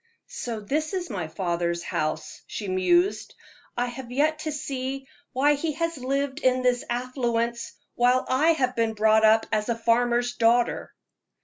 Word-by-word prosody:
"So 230 -3 -5
this 305 - -2
is 355 -6 -4
my 180 -6 -3
father's 170 0 -2
house," 155 -3 -3
she 205 - -5
mused. 345 - +1 0.4
"I 245 - +1
have 245 0 -7
yet 305 +4 +1
to 310 0 -3
see 270 -1 -4 0.2
why 285 +3 +3
he 305 +2 -2
has 330 +2 -2
lived 275 +2 -1
in 255 -2 +2
this 245 -1 +2
affluence, 240 -1 -2 0.2
while 250 +1 +3
I 305 +6 +3
have 255 -5 0
been 225 -1 0
brought 220 +1 +4
up 220 +1 +5
as 215 +1 0
a 235 - +1
farmer's 240 +1 +2
daughter?" 235 +1 +2
245 Hz, 155 wpm, -25 LUFS, 220-275 Hz, 0.4 s, up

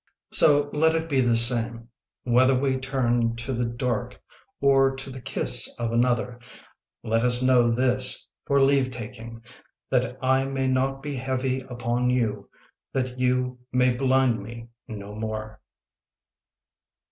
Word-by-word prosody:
So 145 -1 +5
let 160 +2 +2
it 165 0 -2
be 140 -4 +1
the 120 -2 +2
same 115 0 +3 0.3
Whether 130 +2 +3
we 135 -1 0
turn 120 -3 0
to 120 +3 -5
the 120 0 -1
dark 120 +1 -3 0.4
or 135 -1 +3
to 135 0 -6
the 130 0 -9
kiss - - +2
of 115 -1 -3
another; 120 0 0 0.6
Let 115 +1 0
us 125 0 +3
know 125 -2 +4
this 125 +2 0 0.2
for 140 0 +2
leavetaking, 125 -4 -1 0.5
That 125 -1 0
I 130 +1 +1
may 135 -1 -2
not 135 +1 -1
be 145 -1 -4
heavy 130 0 -2
upon 125 -1 -2
you, 110 -5 -1 0.4
That 130 -1 -3
you 125 0 0
may 125 0 +2
blind 130 -3 +1
me 115 +3 -10 0.2
no 105 -3 -8
more. 110 0 -6
125 Hz, 135 wpm, -24 LUFS, 115-130 Hz, 0.6 s, So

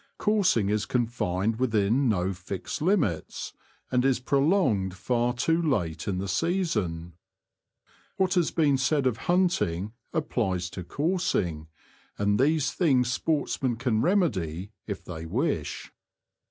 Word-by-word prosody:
Coursing 195 - +2
is 105 0 0
confined 115 -3 -1
within 115 +1 +2
no 95 -2 0
fixed 90 +5 -6
limits, 155 - 0 0.4
and 125 -1 +2
is 135 -2 +2
pro 135 +2 +1
longed 130 - +2
far 120 +5 0
too 160 +7 +1
late 85 - -1
in 95 -2 -1
the 95 +2 -3
season. 95 - -1 1.0
What 190 -1 +2
has 175 -4 +2
been 145 -5 +2
said 140 +1 +1
of 125 -4 +1
hunting 115 - +1 0.2
applies 95 - -1
to 95 - -6
coursing, 100 - -1 0.5
and 105 0 +1
these 150 +2 +2
things 130 -8 +2
sportsmen 140 -5 0
can 115 -2 0
remedy 100 - 0 0.2
if 100 -3 -5
they 80 -2 -7
wish. - - -2
120 Hz, 125 wpm, -27 LUFS, 95-155 Hz, 1.0 s, Coursing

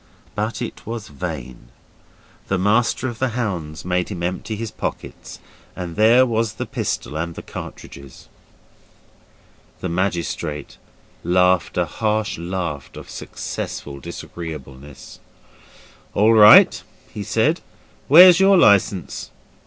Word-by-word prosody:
But 105 +3 -3
it - - -8
was 115 -2 -6
vain. 65 -3 -7 0.8
The 95 - 0
Master 110 +6 +1
of 120 -3 -6
the 125 -3 -1
Hounds 85 - -4
made 90 0 -1
him 90 -4 -6
empty 90 +5 -3
his 115 0 -5
pockets, - - -6 0.4
and 85 -2 -6
there 115 +4 +5
was 115 -2 -1
the - - -5
pistol - - -4
and 85 +1 -4
the - - -8
cartridges. 70 -1 -10 1.5
The 90 - -4
magistrate 85 -4 -3 0.4
laughed 90 +1 +2
a 90 - +2
harsh 105 +3 -2
laugh 85 -5 -4
of - - -10
successful 70 -1 -6
disagreeableness. 70 -3 -9 1.0
'All 110 +3 +4
right,' 105 -1 +8 0.4
said - - +1
he, - - -30 0.4
'where's 175 +4 +9
your 195 0 +5
licence? 100 - +2
95 Hz, 115 wpm, -21 LUFS, 85-110 Hz, 1.5 s, where's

